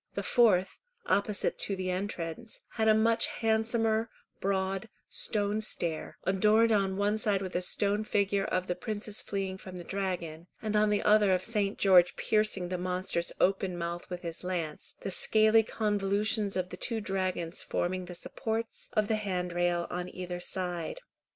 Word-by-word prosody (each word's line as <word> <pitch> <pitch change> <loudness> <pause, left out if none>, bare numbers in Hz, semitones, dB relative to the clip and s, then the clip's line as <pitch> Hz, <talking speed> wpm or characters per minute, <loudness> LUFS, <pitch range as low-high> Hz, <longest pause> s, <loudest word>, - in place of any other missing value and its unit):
The - - -2
fourth, 195 -6 +3 0.3
opposite 200 0 +1
to 200 - -2
the 185 -1 -2
entrance, 185 +2 -4
had 220 -1 0
a 220 - +7
much 225 +1 +3
handsomer, 225 0 +1 0.3
broad, 195 +1 -1 0.2
stone 210 0 0
stair, 170 -6 -2
adorned 210 +5 +4
on 195 -3 +2
one 205 +2 +1
side 200 -2 +1
with 185 - -6
a 180 - +1
stone 205 +3 +1
figure 200 -2 +1
of 185 0 -1
the 180 - -1
princess 210 +2 -3
fleeing 190 -1 -3
from 185 -1 -9
the 175 - -6
dragon, 175 -4 -4
and 215 -1 -2
on 210 0 +4
the 205 -1 +1
other 210 -2 +5
of 185 - -3
St. 210 -3 0
George 180 -3 +5
piercing 215 -4 +1
the 180 -1 -2
monster's 180 -1 -1
open 190 -1 +1
mouth 170 0 -4
with 180 0 -6
his 165 0 -5
lance, 170 -4 -4
the 195 - -3
scaly 220 +3 +4
convolutions 205 -1 0
of 185 -1 -1
the 180 - -7
two 230 +2 -2
dragons 185 -4 -2
forming 185 +1 -2
the 180 0 -8
supports 225 +5 -4
of 215 -1 +2
the 220 -1 +1
handrail 175 -3 0
on 180 0 -3
either 180 -1 -5
side. 180 - -3
195 Hz, 165 wpm, -30 LUFS, 180-215 Hz, 0.3 s, a